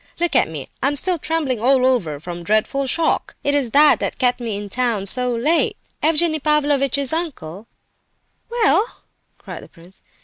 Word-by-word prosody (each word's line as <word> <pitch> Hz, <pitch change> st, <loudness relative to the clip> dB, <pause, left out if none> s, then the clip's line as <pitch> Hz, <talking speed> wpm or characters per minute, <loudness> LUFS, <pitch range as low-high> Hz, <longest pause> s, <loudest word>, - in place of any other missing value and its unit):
Look 345 Hz, 0 st, -1 dB
at -, -, +3 dB
me, 150 Hz, -4 st, -7 dB
I'm 275 Hz, +3 st, +1 dB
still 350 Hz, +4 st, +1 dB
trembling 295 Hz, -7 st, -2 dB
all 255 Hz, +1 st, +3 dB
over 235 Hz, -, +1 dB
with 145 Hz, -, -13 dB
the 175 Hz, 0 st, -7 dB
dreadful 215 Hz, +8 st, 0 dB
shock! 325 Hz, +4 st, 0 dB
It 285 Hz, -, 0 dB
is 280 Hz, -4 st, 0 dB
that 295 Hz, +5 st, +5 dB
that -, -, -3 dB
kept 245 Hz, -1 st, +1 dB
me 225 Hz, -4 st, -4 dB
in 205 Hz, 0 st, -6 dB
town 230 Hz, -2 st, -1 dB
so 250 Hz, +5 st, +2 dB
late. 305 Hz, +9 st, +1 dB, 0.2 s
Evgenie 315 Hz, 0 st, +2 dB
Pavlovitch's 280 Hz, -2 st, +1 dB
uncle—" 230 Hz, -, -5 dB, 0.8 s
"Well?" 440 Hz, -5 st, +3 dB, 0.5 s
cried -, -, -9 dB
the -, -, -14 dB
prince. 175 Hz, +3 st, -18 dB
260 Hz, 170 wpm, -20 LUFS, 215-305 Hz, 0.8 s, that